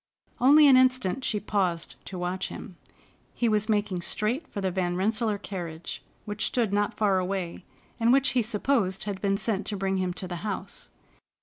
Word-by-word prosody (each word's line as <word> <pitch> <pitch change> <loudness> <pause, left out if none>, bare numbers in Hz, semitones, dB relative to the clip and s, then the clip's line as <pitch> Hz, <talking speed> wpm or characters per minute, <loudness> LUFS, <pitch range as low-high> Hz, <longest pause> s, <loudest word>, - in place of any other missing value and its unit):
Only 290 +4 +7
an 265 -2 +8
instant 255 -2 +2
she 215 -4 0
paused 185 -5 -1
to 185 - -6
watch 180 +1 -2
him. 195 -6 -9 0.6
He 240 - +1
was 215 0 +1
making 205 -4 0
straight 235 - -1
for - - -6
the 190 -1 0
Van 175 -1 -1
Rensselaer 215 +3 0
carriage, 175 -5 -6 0.2
which 210 -1 -1
stood 230 -5 0
not 205 0 0
far 200 -3 +3
away, 185 -1 -3 0.4
and 230 +1 +4
which 270 0 +4
he 245 0 +2
supposed 215 -3 0
had 195 -2 -4
been 195 -1 +1
sent 200 0 -1
to 205 - -2
bring 195 0 0
him 185 -1 0
to 185 - -6
the 175 -1 -4
house. 195 +1 -5
205 Hz, 185 wpm, -27 LUFS, 185-225 Hz, 0.6 s, an